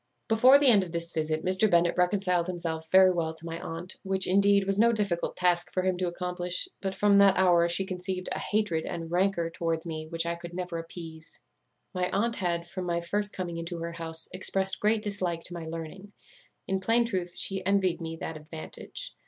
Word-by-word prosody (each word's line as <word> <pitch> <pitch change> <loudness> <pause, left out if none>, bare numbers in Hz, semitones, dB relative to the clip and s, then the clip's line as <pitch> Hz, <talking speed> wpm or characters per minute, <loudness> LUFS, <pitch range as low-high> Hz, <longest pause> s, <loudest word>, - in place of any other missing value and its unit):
"Before 250 +5 +7
the 285 - +1
end 215 -7 +6
of 175 -2 -9
this 170 0 -4
visit 155 -1 -2
Mr. 185 +4 +4
Bennet 170 -1 +3
reconciled 180 -1 +1
himself 165 -3 -4
very 185 +1 +7
well 165 -2 -2
to 160 - -10
my 165 0 -5
aunt, 165 +3 -6
which, 190 0 0
indeed, 200 +1 +4
was 195 +1 -1
no 235 +1 +5
difficult 200 -6 -2
task 175 -1 +1
for 185 - -1
him 185 -1 +1
to 180 0 -1
accomplish; 180 - -2
but 195 -1 -3
from 205 -1 +4
that 195 -1 +6
hour 175 -2 +4
she 180 +3 +1
conceived 185 0 -4
a - - -2
hatred 205 -7 0
and 165 -1 -5
rancour 175 -2 +1
towards 165 0 -2
me 155 -1 -5
which 165 0 +1
I 170 - 0
could 170 0 -9
never 180 -2 -4
appease. 165 -1 -9 0.5
"My 180 0 -1
aunt 230 +4 0
had, 170 -2 -2
from 185 +1 -5
my 170 0 0
first 205 +4 -1
coming 175 -3 -5
into 170 +1 -5
her 170 0 -4
house, 165 -1 -1
expressed 190 +1 -1
great 215 0 +1
dislike 185 -5 -2
to 175 - -3
my 170 - -6
learning. 165 +5 -7 0.6
In 190 0 0
plain 230 +5 +2
truth, 185 -6 -3
she 195 -1 +1
envied 190 -2 +1
me 165 0 -5
that 160 - -4
advantage. 155 +1 -8
180 Hz, 205 wpm, -28 LUFS, 170-195 Hz, 0.6 s, Before